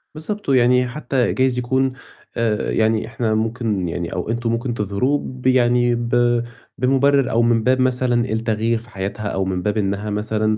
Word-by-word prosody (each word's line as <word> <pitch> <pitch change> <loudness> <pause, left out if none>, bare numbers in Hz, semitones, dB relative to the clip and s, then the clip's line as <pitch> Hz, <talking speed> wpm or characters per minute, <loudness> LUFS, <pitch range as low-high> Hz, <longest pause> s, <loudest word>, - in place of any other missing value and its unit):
بالضبط. 205 +2 -5
ويعني 125 -1 +4
حتّى 130 -2 -1
جايز 130 -1 +1
يكون 130 +2 +1 0.5
آآ 110 -2 0
يعني 110 0 +1
إحنا 115 -1 -1
ممكن 110 -4 -1
يعني 85 +1 -4
أو 90 +4 -4
أنتم 115 0 -1
ممكن 120 +1 -2
تظهروه 105 +7 0
ب 130 0 -5
يعني 120 -1 +3
ب 120 0 +1 0.3
بمُبرِّر 135 +1 +2
أو 115 +1 +3
من 115 -1 +2
باب 130 +1 +2
مثلًا 125 -2 +1
التغيير 110 +1 0
في 120 +1 -16
حياتها 100 +1 -4
أو 95 -1 -1
من 90 -1 -2
باب 105 +3 -1
إنّها 100 +1 -1
مثلًا 110 +1 -1
120 Hz, 170 wpm, -20 LUFS, 110-125 Hz, 0.5 s, ويعني